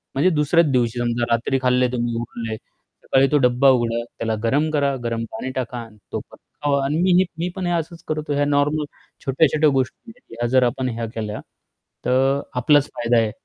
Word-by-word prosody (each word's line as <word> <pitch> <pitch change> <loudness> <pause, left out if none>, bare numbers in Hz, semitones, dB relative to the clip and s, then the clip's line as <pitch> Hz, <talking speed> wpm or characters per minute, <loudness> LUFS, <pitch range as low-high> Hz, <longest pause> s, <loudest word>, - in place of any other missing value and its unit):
म्हणजे 145 +7 +4
दुसऱ्याच 165 +1 +3
दिवशी 120 -2 +1
समजा 120 0 0
रात्री 125 +3 0
खाल्लंय 125 0 +3
तुम्ही, 120 -1 -1
उरलंय, 115 -1 -5
सकाळी 135 +4 -1
तो 150 - +5
डब्बा 125 +2 +4
उघडा, 120 -2 +2 0.2
त्याला 110 -1 -1
गरम 145 +7 +2
करा, 140 -2 +1
गरम 115 -1 -2
पाणी 130 +4 -5
टाका 125 -1 -3
आणि 115 -2 -9
तो - - -2
पण - - -14 0.3
खावा 140 -1 +2
आणि 145 +3 0
मी 185 +1 +3
ही 190 - +4
मी 175 +2 -1
पण 190 -2 -3
हे - - 0
असंच 170 0 -3
करतो. 155 -1 -2
या 145 0 +1
नॉर्मल, 145 +1 +1 0.4
छोट्या-छोट्या 150 +2 +3
गोष्टी 135 - -2
आहेत, 245 - -26 0.2
ह्या 120 - +1
जर 130 +1 +4
आपण 125 +1 0
ह्या 115 -1 -3
केल्या, 110 -1 -4 0.7
तर 135 +2 +2
आपलाच 145 +3 +3
फायदा 120 0 +1
आहे. 110 -2 +2
130 Hz, 195 wpm, -22 LUFS, 120-145 Hz, 0.7 s, तो